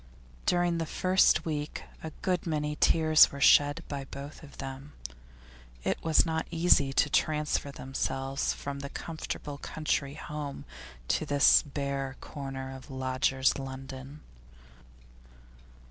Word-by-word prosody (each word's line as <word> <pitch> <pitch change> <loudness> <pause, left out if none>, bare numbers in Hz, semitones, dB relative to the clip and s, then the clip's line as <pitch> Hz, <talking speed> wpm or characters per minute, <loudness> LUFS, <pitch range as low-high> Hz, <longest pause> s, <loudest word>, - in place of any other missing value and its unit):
During 175 -1 +2
the 165 - -2
first 185 -2 +3
week 150 -2 -3 0.2
a 160 - -5
good 180 -2 0
many 150 -2 -1
tears 155 0 +5
were 140 - -7
shed 145 +1 +5
by 140 -2 -5
both 140 +2 -9
of 150 -3 -14
them; 135 +2 -7 0.9
it - - -1
was 160 +1 +4
not 160 -1 -2
easy 165 -5 +4
to 135 - +3
transfer 150 -1 0
themselves 135 0 -2
from 140 0 -5
the 140 0 -6
comfortable 155 -3 -6
country 150 -3 -2
home 150 -2 -6 0.4
to - - +1
this 145 -1 +5
bare 140 -2 -3
corner 135 -2 -6
of 130 +3 -12
lodgers' 130 0 +1
London. 135 +2 -8
145 Hz, 125 wpm, -29 LUFS, 135-155 Hz, 0.9 s, tears